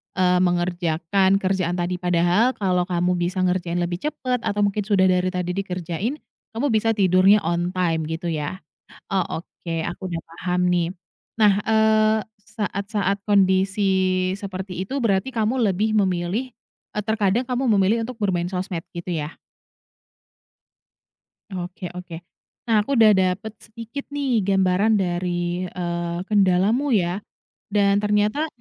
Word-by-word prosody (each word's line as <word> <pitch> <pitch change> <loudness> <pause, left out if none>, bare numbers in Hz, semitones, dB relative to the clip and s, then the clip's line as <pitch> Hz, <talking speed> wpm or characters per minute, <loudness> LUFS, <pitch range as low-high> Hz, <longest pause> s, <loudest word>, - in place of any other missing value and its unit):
eee, 180 -1 +3
mengerjakan 175 +1 +1
kerjaan 185 -2 0
tadi. 180 0 -2
Padahal, 180 +7 +2
kalau 180 -3 0
kamu 180 0 0
bisa 180 +2 -1
ngerjain 180 -1 0
lebih 175 0 -3
cepat, 255 -4 -2
atau 205 0 0
mungkin 205 0 0
sudah 190 -3 +4
dari 180 0 +1
tadi 180 -1 -2
dikerjain, 185 - -3 0.4
kamu 240 +6 0
bisa 225 +1 +2
tidurnya 195 +1 +5
on 175 +2 -1
time, 165 -3 0
gitu 165 +2 -3
ya? 155 +4 -4 0.5
Oh, 190 -2 +1 0.2
oke 170 0 -9 0.2
aku 175 - -8
udah 165 -1 -3
paham 180 +2 -2
nih. 175 -1 +1 0.5
Nah, 210 -2 +6
eee, 220 0 +3 0.4
saat-saat 200 -1 -1
kondisi 190 -1 +2
seperti 190 -2 -5
itu, 270 +8 -3
berarti 205 0 +1
kamu 230 +2 0
lebih 215 +4 0
memilih 190 +5 0 0.5
eee, 210 - 0
terkadang 220 +1 +1
kamu 250 +1 -1
memilih 210 +3 +2
untuk 250 +1 -7
bermain 180 -4 0
sosmed, 180 -2 -3
gitu 170 +1 -5
ya? 150 +1 -5 2.2
Oke 180 -1 -6
oke. 180 -1 -8 0.5
Nah, 225 -3 +2
aku 245 +7 0
udah 220 -3 +7
dapat 190 +2 +1
sedikit 230 +5 -8
nih 280 -5 0
gambaran 195 +2 +3
dari, 175 -1 -1
eee, 170 -1 -3
kendalamu 210 +7 +3
ya 180 -1 0 0.5
dan 200 -1 +3
ternyata 210 +8 +1
190 Hz, 135 wpm, -23 LUFS, 180-210 Hz, 2.2 s, udah